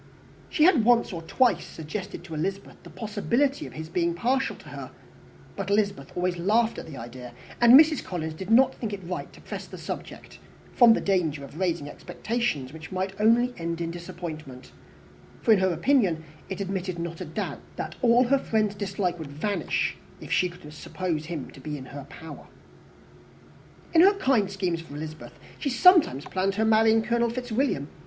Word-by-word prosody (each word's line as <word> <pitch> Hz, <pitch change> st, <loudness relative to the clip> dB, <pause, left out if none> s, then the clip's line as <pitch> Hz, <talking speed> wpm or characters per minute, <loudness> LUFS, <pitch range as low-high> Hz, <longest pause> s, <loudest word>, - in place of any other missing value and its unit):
She 305 Hz, -, +2 dB
had 315 Hz, -, +6 dB
once 235 Hz, -3 st, +3 dB
or 170 Hz, -, -5 dB
twice 245 Hz, +9 st, +2 dB
suggested 170 Hz, +3 st, -7 dB
to 175 Hz, -2 st, -9 dB
Elizabeth 190 Hz, +6 st, -4 dB
the -, -, -13 dB
possibility 235 Hz, +6 st, -1 dB
of -, -, -12 dB
his 155 Hz, 0 st, -6 dB
being 170 Hz, 0 st, 0 dB
partial 255 Hz, +8 st, 0 dB
to -, -, -14 dB
her, -, -, -7 dB, 0.7 s
but 195 Hz, -1 st, -4 dB
Elizabeth 200 Hz, -7 st, 0 dB
always 180 Hz, 0 st, 0 dB
laughed 220 Hz, +6 st, +2 dB
at -, -, -9 dB
the 145 Hz, -4 st, -9 dB
idea; 120 Hz, +1 st, -9 dB, 0.3 s
and 240 Hz, +3 st, +10 dB
Mrs. 310 Hz, -2 st, +4 dB
Collins 160 Hz, -3 st, -4 dB
did 190 Hz, +5 st, -8 dB
not 250 Hz, +4 st, +5 dB
think 220 Hz, -3 st, -5 dB
it 195 Hz, -2 st, -6 dB
right 180 Hz, +1 st, -5 dB
to -, -, -16 dB
press -, -, -7 dB
the -, -, -9 dB
subject, -, -, -8 dB, 0.3 s
from 235 Hz, -2 st, +7 dB
the -, -, 0 dB
danger 165 Hz, -7 st, 0 dB
of 150 Hz, +4 st, -11 dB
raising 170 Hz, -5 st, -1 dB
expectations 155 Hz, -, -3 dB
which 160 Hz, +2 st, -10 dB
might 190 Hz, +1 st, -2 dB
only 240 Hz, +3 st, +4 dB
end 170 Hz, 0 st, -3 dB
in 165 Hz, -1 st, -2 dB
disappointment; 165 Hz, -7 st, -8 dB, 0.7 s
for 230 Hz, -, +4 dB
in 210 Hz, -, +6 dB
her 190 Hz, 0 st, +2 dB
opinion 175 Hz, -, +2 dB, 0.3 s
it 190 Hz, -, -4 dB
admitted 190 Hz, -2 st, -3 dB
not 170 Hz, +1 st, -5 dB
of 175 Hz, -, -6 dB
a -, -, -12 dB
doubt, -, -, -3 dB, 0.2 s
that -, -, -5 dB
all 240 Hz, 0 st, +5 dB
her 270 Hz, +2 st, +3 dB
friend's 215 Hz, -5 st, 0 dB
dislike 195 Hz, -3 st, -2 dB
would 150 Hz, -3 st, -7 dB
vanish, 170 Hz, +4 st, -1 dB, 0.2 s
if -, -, -10 dB
she 180 Hz, -, +3 dB
could 170 Hz, -4 st, -12 dB
suppose 160 Hz, -1 st, -3 dB
him 165 Hz, -6 st, -5 dB
to -, -, -14 dB
be 150 Hz, +2 st, -5 dB
in 130 Hz, -, -9 dB
her 140 Hz, +1 st, -9 dB
power. 160 Hz, -4 st, -10 dB, 1.5 s
In 330 Hz, -, +7 dB
her 395 Hz, +3 st, +7 dB
kind 260 Hz, -, +2 dB
schemes 185 Hz, -4 st, -2 dB
for 155 Hz, -3 st, -11 dB
Elizabeth, 155 Hz, +1 st, -8 dB, 0.2 s
she 285 Hz, -, -1 dB
sometimes 270 Hz, -, +5 dB
planned 190 Hz, +1 st, -1 dB
her 220 Hz, +1 st, +1 dB
marrying 220 Hz, 0 st, +4 dB
Colonel 235 Hz, +1 st, +1 dB
Fitzwilliam. 245 Hz, -, -1 dB
190 Hz, 185 wpm, -26 LUFS, 160-230 Hz, 1.5 s, and